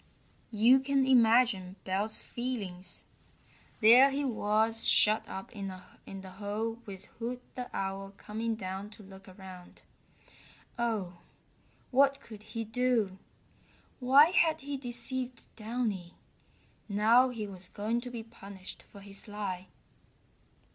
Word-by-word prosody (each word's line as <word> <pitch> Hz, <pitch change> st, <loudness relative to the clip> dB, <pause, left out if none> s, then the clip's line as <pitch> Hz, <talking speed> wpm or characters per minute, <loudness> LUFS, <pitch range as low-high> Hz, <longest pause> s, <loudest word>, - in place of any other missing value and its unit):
You 235 Hz, +4 st, +5 dB
can 270 Hz, 0 st, +1 dB
imagine 230 Hz, -6 st, +3 dB
Belt's 200 Hz, +3 st, +1 dB
feelings! 200 Hz, -8 st, -3 dB, 0.8 s
There 245 Hz, +5 st, +8 dB
he 280 Hz, +1 st, -2 dB
was 220 Hz, -1 st, +1 dB
shut 215 Hz, +1 st, +5 dB
up 190 Hz, -, -7 dB
in 200 Hz, -4 st, -6 dB
the 190 Hz, +1 st, -11 dB
hole 215 Hz, +4 st, -4 dB
with 190 Hz, -2 st, -8 dB
Hoot 245 Hz, +2 st, -4 dB
the 250 Hz, -1 st, -6 dB
Owl 195 Hz, +1 st, -4 dB
coming 225 Hz, +2 st, -3 dB
down 190 Hz, 0 st, -6 dB
to 215 Hz, -, -13 dB
look 195 Hz, 0 st, -14 dB
around. 185 Hz, -1 st, -13 dB, 1.0 s
Oh, 205 Hz, -7 st, -2 dB, 0.7 s
what 275 Hz, +1 st, +4 dB
could 215 Hz, -5 st, -12 dB
he 225 Hz, +1 st, -6 dB
do! 225 Hz, -4 st, 0 dB, 0.8 s
Why 275 Hz, +6 st, +6 dB
had 330 Hz, -3 st, +2 dB
he 285 Hz, +1 st, -4 dB
deceived 250 Hz, 0 st, -2 dB
Downy! 215 Hz, -6 st, -3 dB, 0.7 s
Now 225 Hz, +5 st, +4 dB
he 230 Hz, -4 st, -5 dB
was 190 Hz, -3 st, -7 dB
going 220 Hz, +5 st, -2 dB
to 250 Hz, -, -7 dB
be 235 Hz, -2 st, -6 dB
punished 200 Hz, -4 st, -10 dB
for 200 Hz, -, -15 dB
his 195 Hz, +1 st, -8 dB
lie. 195 Hz, -3 st, -5 dB
220 Hz, 120 wpm, -30 LUFS, 195-245 Hz, 1.0 s, There